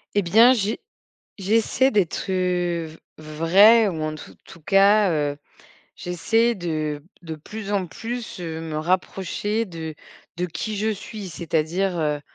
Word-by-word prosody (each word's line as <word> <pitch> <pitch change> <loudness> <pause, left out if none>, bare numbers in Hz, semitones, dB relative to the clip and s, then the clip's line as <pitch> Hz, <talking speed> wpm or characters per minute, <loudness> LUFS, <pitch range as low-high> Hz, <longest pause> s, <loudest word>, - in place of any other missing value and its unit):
Eh 205 - +4
bien, 225 +8 +6
j'ai 215 -2 -1 0.6
j'essaie 225 +6 +2
d'être, 195 -2 0
heu, 180 -2 0
v 155 +1 -13 0.2
vraie 180 +9 +5
ou 160 -4 -5
en 155 0 -2
tout 155 - -12
tout 170 - -14
cas, 200 +3 +4
heu, 145 -2 -1 0.6
j'essaie 225 +7 +1
de 155 -5 -3 0.2
de 160 -2 -6
plus 205 +6 -7
en 195 -3 0
plus, 230 +6 -6
heu, 160 -2 -5
me 160 -2 -5
rapprocher 190 +5 -1
de 160 -4 -7 0.4
de 175 - -1
qui 195 +6 -5
je 215 +2 0
suis, 210 -1 -7
c'est-à-dire, 170 +3 -1
heu, 150 -1 -1
180 Hz, 145 wpm, -23 LUFS, 160-210 Hz, 0.6 s, bien